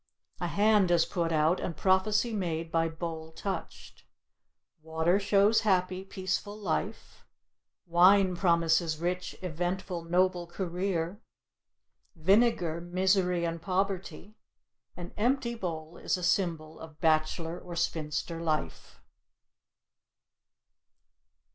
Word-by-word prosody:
A - - -2
hand 210 -2 +3
is 170 -2 +4
put 170 -3 -2
out 160 +3 +2
and 165 -4 -4
prophecy 210 +4 +2
made 165 -5 -3
by 165 0 +1
bowl 160 -1 -6
touched. 185 +1 -6 0.8
Water 160 +4 +1
shows 205 +2 +3
happy, 185 -2 +1
peaceful 195 +2 -4
life; 205 +2 -4 0.6
wine 185 +2 +5
promises 170 -2 +2
rich, 180 +2 -3
eventful, 175 +1 -3
noble 180 0 +1
career; 180 +1 -3 0.9
vinegar, 175 -2 +2
misery 180 0 +1
and 165 0 -3
poverty; 195 +2 -3 0.6
an 175 -1 -8
empty 240 +2 +1
bowl 170 -6 -6
is - - -1
a 180 - -7
symbol 165 -4 -1
of 160 -1 -12
bachelor 160 +1 +1
or 175 -1 -9
spinster 165 0 -2
life. 155 -2 -3
175 Hz, 105 wpm, -29 LUFS, 165-195 Hz, 0.9 s, wine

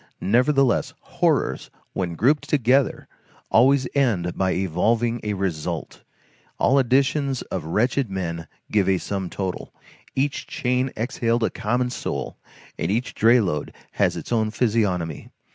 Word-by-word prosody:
Nevertheless, 130 +4 +2
horrors, - - 0 0.2
when 90 -3 -2
grouped 140 - +2
together, 135 -1 +2 0.4
always 130 +2 +4
end 105 -11 +1
by 95 -1 +1
evolving 115 +6 +1
a 105 -1 -2
result; 90 -6 -3 0.6
all 140 - +4
additions 135 +1 +1
of 90 -5 -5
wretched 120 - +1
men 85 -4 -4 0.2
give 100 -3 +2
a 95 - +3
sum 95 -1 -4
total, 95 -1 -4 0.4
each 140 +1 -1
chain 125 +1 0
exhaled 115 0 0
a - - +1
common 125 +3 -1
soul, - - -4 0.4
and 80 - -1
each 115 +6 -1
dray 115 +3 +5
load 90 -9 -2 0.2
had - - +1
its - - -7
own 110 -2 +2
physiognomy. 105 - -1
115 Hz, 130 wpm, -23 LUFS, 95-130 Hz, 0.6 s, dray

